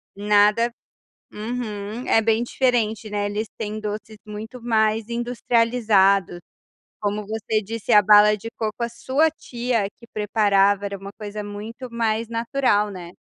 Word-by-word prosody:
Nada, 210 +3 +3 0.6
uhum, 215 0 -5
é 225 - +4
bem 225 +1 +2
diferente, 230 -4 0
né, 205 -1 -1
eles 210 +2 -3
têm 215 -1 -4
doces 215 +1 -6
muito 220 +3 -8
mais 220 -1 +1
industrializados, 230 -6 +2 0.6
como 210 0 -2
você 220 0 -1
disse 225 +1 -4
a 210 - +8
bala 210 +1 +6
de 225 +3 -7
coco 220 +1 -3
a 235 - -1
sua 275 +6 +1
tia 240 -6 -2
é 195 - -4
que 235 - -18
preparava 205 -1 +2
era 200 0 -4
uma 195 +1 -9
coisa 210 0 -6
muito 220 +5 -8
mais 230 -1 -1
natural, 230 -3 +1
né. 175 -2 -9
215 Hz, 145 wpm, -23 LUFS, 205-230 Hz, 0.6 s, a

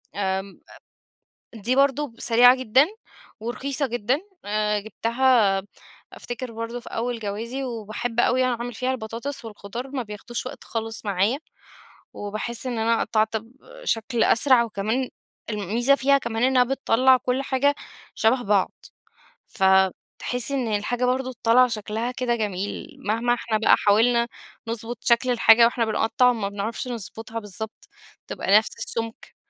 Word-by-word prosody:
آمم 190 0 -3 1.0
دي 225 +4 -1
برضه 275 -1 +2
سريعة 245 +2 +6
جدًا 260 +3 +4 0.5
ورخيصة 270 +5 -2
جدًا، 240 +3 -1 0.2
آآ 210 0 0
جبتها 225 -2 +2 0.5
أفتكِر 245 0 -6
برضه 230 +2 -5
في - - -11
أول 240 +1 -2
جوازي، 225 +6 -4
وباحب 230 0 -3
أوي 255 +1 +3
أعمل 245 -1 -2
فيها 255 +2 -1
البطاطس 240 +3 -5
والخضار 225 +3 -7
ما 265 -2 -2
بياخدوش 225 +3 -6
وقت - - -8
خالص 225 -1 -4
معايا، 200 +7 +1 0.8
وباحس 215 +4 -4
إن 245 -2 -2
أنا 225 +1 +2
قطّعت 220 0 +1
بشكْل 240 - -3
أسرع 245 0 +4
وكمان، 225 +4 -2 0.4
الميزة 220 +6 +1
فيها 275 0 +3
كمان 235 -2 -3
إنها 255 -1 +4
بتطلّع 260 0 +3
كل 255 +1 -1
حاجة 280 +2 +1 0.4
شبه 245 +3 +2
بعض، 200 -3 +2 0.8
فتحسّي 190 +6 +1
إن 260 -4 0
الحاجة 245 +4 -1
برضه 255 +1 -1
طالعة 250 +2 +6
شكلها 225 +2 -3
كده 250 -2 -1
جميل، 210 - -4
مهما 230 +1 0
إحنا 235 -2 -1
بقى 220 - +5
حاولنا 235 +3 +3 0.4
نضبُط 230 +1 -4
شكْل 245 +1 +3
الحاجة 230 -1 +6
وإحنا 235 0 +1
بنقطّع 225 +3 +2
ما 205 -4 -3
بنعرفش 210 +5 -4
نضبُطها 225 0 -6
بالضبط، 215 +1 -7 0.4
تبقى 200 +2 +3
نفْس 220 - 0
السُّمك 225 0 -4
235 Hz, 130 wpm, -24 LUFS, 215-255 Hz, 1.0 s, سريعة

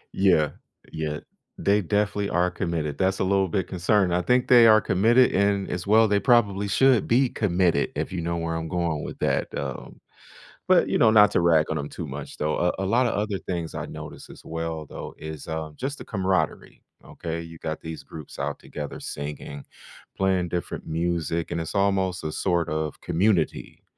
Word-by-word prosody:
Yeah, 90 -6 +3 0.4
yeah, 75 -1 -3 0.4
they 100 +1 +2
definitely 100 +2 0
are 90 +1 +1
committed, 80 -5 -3
that's 95 +1 +1
a - - +1
little 95 0 +2
bit 95 +1 -1
concerning. 95 +1 +1
I 90 - +1
think 125 +5 +2
they 120 -2 +8
are 110 0 +7
committed, 115 +7 +4
and 100 0 +1
as 90 +2 -4
well, 110 +1 +5
they 100 0 +2
probably 105 -5 +3
should 125 +2 +3
be 125 +2 +3
committed 90 -7 +1
if - - -3
you 85 - -2
know 85 +1 -2
where 85 0 -2
I'm 80 0 -3
going 85 -4 -1
with - - -7
that, - - 0
um, 70 -3 -6 0.7
but, - - +5
you - - +1
know, 110 - +5
not 105 -2 +6
to - - +2
rag 80 -3 +4
on 80 - -1
'em 70 0 -4
too - - -6
much, - - -7
though. 75 0 0
Uh, 90 0 +1
a 95 - -1
lotta 120 +4 +2
other 105 -1 -1
things 85 -3 -4
I - - -4
noticed - - -9
as - - -14
well, 80 -1 -4
though, - - -8
is, 80 -2 -8
uh, 80 -1 -4
just 135 +2 -4
the - - -10
camaraderie, 95 -6 -1 0.2
okay? 85 0 -5
You 85 0 -10
got 80 -1 -4
these 80 0 -7
groups 75 -4 -10
out 70 +1 -3
together 75 -1 -7
singing, 70 -1 -6 0.5
playing 95 -2 +1
different 85 0 -4
music, 85 0 -1
and 85 - -1
it's 80 +5 -5
almost 95 -2 +1
a 80 - -3
sort 85 -2 0
of 80 -1 -3
community. 95 +1 0
90 Hz, 195 wpm, -25 LUFS, 80-100 Hz, 0.7 s, they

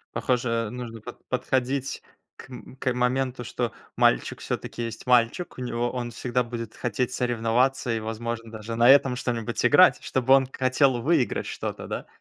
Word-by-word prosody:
Похоже 115 -3 0
нужно 120 -2 -7
под - - -11
подходить 130 +1 -1 0.3
к - - -13
м 125 +1 -11
к 130 -1 -1
моменту, 125 0 0
что 120 0 -3 0.2
мальчик - - +2
всё-таки 120 - -4
есть 115 +2 -7
мальчик, 125 +6 +2
у - - -4
него 120 0 -1
он 120 -2 -4
всегда 125 +2 -1
будет 115 -2 -6
хотеть 125 +2 -2
соревноваться 120 +1 +1
и 115 - -1
возможно 115 +1 -5
даже 110 +1 -6
на 120 +1 +5
этом 135 -2 +5
что-нибудь 115 -3 -2
играть, - - +6
чтобы 130 +1 +3
он 135 -1 +4
хотел 130 -1 +2
выиграть 150 -3 +1
что-то, - - -5
да. - - -5
125 Hz, 160 wpm, -25 LUFS, 115-130 Hz, 0.3 s, играть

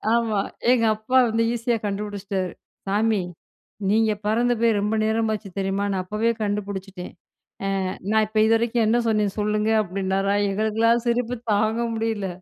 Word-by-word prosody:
ஆமா. 225 -3 +1 0.3
எங்க 240 -2 +3
அப்பா 220 +5 0
வந்து 225 +1 +1
ஈஸியா 235 0 0
கண்டுபிடிச்சிட்டாரு. 200 -2 -3 0.4
சாமி! 210 +1 +1 0.7
நீங்க 220 +1 +3 0.2
பறந்து 240 +3 +2
போய் 230 -2 +3
ரொம்ப 210 +2 0
நேரமாச்சு 220 -1 -1
தெரியுமா? 195 +1 -1
நான் 190 -1 -1
அப்பவே 215 +4 0
கண்டுபிடிச்சிட்டேன். 200 -2 -4 0.5
ஆ - - 0 0.4
நான் 220 0 +4
இப்ப 215 0 -2
இதுவரைக்கும் 225 +1 +2
என்ன 225 +2 +3
சொன்னேன்? 210 -3 +1
சொல்லுங்க 210 +1 0
அப்பிடின்னாரா, 195 0 -1 0.2
எங்களுக்கெல்லாம் 225 +3 +1
சிரிப்பு 240 +1 0 0.2
தாங்க 215 +2 +1 0.2
முடியல. 220 -3 -2
215 Hz, 135 wpm, -23 LUFS, 200-225 Hz, 0.7 s, நான்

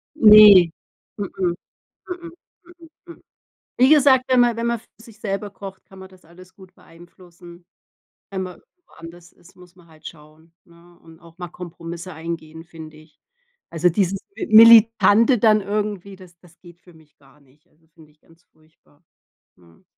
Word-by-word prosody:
Ne, 210 - +7 0.5
mm, 205 - -5
mm, 180 -2 -2 0.5
mm, 350 -2 -9 0.8
mm. 340 - -15 0.6
Wie 255 - +4
gesagt, 275 -4 +3
wenn 255 -1 +2
man 240 -1 +1
wenn 230 0 -4
man 235 -1 -2
für - - -28 0.2
sich 225 -2 -19
selber 200 0 -6
kocht, 195 -1 -13
kann 190 - -18
man 190 0 -13
das 185 -1 -23
alles 180 +3 -19
gut 185 -2 -19
beeinflussen. 175 0 -19 0.6
Wenn 190 -1 -5
man 180 -1 -10 0.3
woanders 170 +1 -16
isst, 175 - -24
muss 180 -1 -20
man 175 -2 -23
halt 155 -1 -18
schauen, 160 +1 -17
ne, 170 0 -23
und 165 0 -20
auch 170 0 -20
mal 175 -1 -8
Kompromisse 170 +1 -11
eingehen, 160 0 -9
finde 160 -2 -14
ich. 155 0 -23 0.5
Also, 170 +1 0
dieses 195 +2 -2 0.2
militante 230 +2 +4
dann 215 -1 +2
irgendwie, 205 -1 -6
das 180 -2 -19
das 175 -2 -24
geht 175 -1 -18
für 175 -1 -22
mich 155 -2 -25
gar 140 +1 -26
nicht. 140 +4 -31
Also, 160 -1 -36
finde 155 -1 -23
ich 150 - -39
ganz 165 +1 -28
furchtbar, 155 0 -33 0.5
mhm. 85 -2 -26
175 Hz, 165 wpm, -19 LUFS, 165-205 Hz, 0.8 s, Ne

